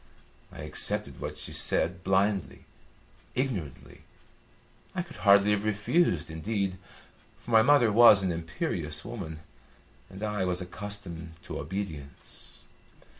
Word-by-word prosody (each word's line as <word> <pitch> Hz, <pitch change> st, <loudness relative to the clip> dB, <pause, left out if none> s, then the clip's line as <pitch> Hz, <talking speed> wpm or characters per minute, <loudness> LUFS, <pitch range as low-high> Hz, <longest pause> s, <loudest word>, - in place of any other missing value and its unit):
I -, -, -9 dB
accepted -, -, 0 dB
what -, -, -5 dB
she -, -, -7 dB
said 90 Hz, +1 st, +1 dB
blindly, 95 Hz, +1 st, 0 dB, 0.7 s
ignorantly. 110 Hz, -, -3 dB, 0.9 s
I 180 Hz, -, -1 dB
could 165 Hz, -3 st, -13 dB
hardly 100 Hz, 0 st, +5 dB
have 105 Hz, 0 st, +1 dB
refused, 105 Hz, -, +1 dB
indeed, 95 Hz, +2 st, -2 dB, 0.6 s
for 120 Hz, -, -10 dB
my 110 Hz, -1 st, +7 dB
mother 120 Hz, -2 st, +5 dB
was 105 Hz, -3 st, +8 dB
an 95 Hz, -, +1 dB
imperious 80 Hz, -2 st, -3 dB
woman, 90 Hz, -10 st, -6 dB, 0.7 s
and 95 Hz, +2 st, -9 dB
I 105 Hz, -2 st, -1 dB
was 90 Hz, -1 st, 0 dB
accustomed 90 Hz, -3 st, -6 dB
to -, -, -6 dB
obedience. 75 Hz, -4 st, -7 dB
100 Hz, 120 wpm, -29 LUFS, 85-105 Hz, 0.9 s, was